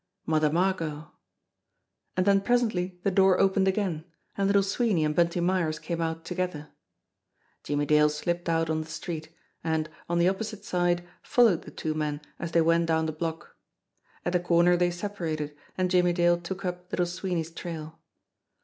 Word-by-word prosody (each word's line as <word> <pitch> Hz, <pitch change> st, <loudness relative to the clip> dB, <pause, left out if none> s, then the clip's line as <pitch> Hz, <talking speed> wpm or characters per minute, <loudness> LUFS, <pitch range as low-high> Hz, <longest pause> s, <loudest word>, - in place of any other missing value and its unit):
Mother 155 Hz, -1 st, +2 dB
Margot! 165 Hz, -3 st, -1 dB, 1.1 s
And 185 Hz, -, +2 dB
then 200 Hz, -1 st, +4 dB
presently 195 Hz, -6 st, 0 dB
the 195 Hz, -, +2 dB
door 190 Hz, 0 st, +4 dB
opened 195 Hz, 0 st, +3 dB
again, 190 Hz, -5 st, 0 dB, 0.3 s
and 195 Hz, -1 st, +1 dB
Little 200 Hz, 0 st, +4 dB
Swee 210 Hz, +2 st, +1 dB
ney 160 Hz, -, +2 dB
and 150 Hz, 0 st, 0 dB
Bunty 170 Hz, +1 st, +2 dB
Myers 175 Hz, -3 st, +1 dB
came 170 Hz, +1 st, -4 dB
out 165 Hz, 0 st, -3 dB
together. 180 Hz, -5 st, -3 dB, 0.9 s
Jimmie 145 Hz, 0 st, 0 dB
Dale 150 Hz, +1 st, +5 dB
slipped 170 Hz, +3 st, -2 dB
out 165 Hz, -1 st, +1 dB
on 160 Hz, 0 st, 0 dB
the 155 Hz, -, -8 dB
street, 160 Hz, -1 st, -5 dB, 0.3 s
and, 160 Hz, -1 st, 0 dB, 0.2 s
on 170 Hz, -, +1 dB
the 170 Hz, -, +4 dB
oppo 190 Hz, +4 st, +1 dB
site 215 Hz, -1 st, -7 dB
side, 175 Hz, -1 st, 0 dB
followed 230 Hz, -9 st, +3 dB
the -, -, -8 dB
two 155 Hz, -, -3 dB
men 150 Hz, -1 st, -2 dB, 0.2 s
as 170 Hz, -, -4 dB
they 165 Hz, -, +4 dB
went 165 Hz, +1 st, +3 dB
down 160 Hz, -1 st, +2 dB
the 160 Hz, -, -1 dB
block. 160 Hz, +1 st, -5 dB, 0.7 s
At 175 Hz, -, 0 dB
the 180 Hz, -, +3 dB
corner 175 Hz, 0 st, +4 dB
they 175 Hz, 0 st, +2 dB
separated, 170 Hz, -5 st, -4 dB, 0.2 s
and 185 Hz, -1 st, 0 dB
Jimmie 180 Hz, -1 st, +4 dB
Dale 175 Hz, 0 st, +3 dB
took 190 Hz, +3 st, -5 dB
up 180 Hz, 0 st, -4 dB
Little 180 Hz, -, +1 dB
Sweeney's 175 Hz, -2 st, -3 dB
trail. 160 Hz, -1 st, -7 dB
175 Hz, 175 wpm, -27 LUFS, 160-185 Hz, 1.1 s, Dale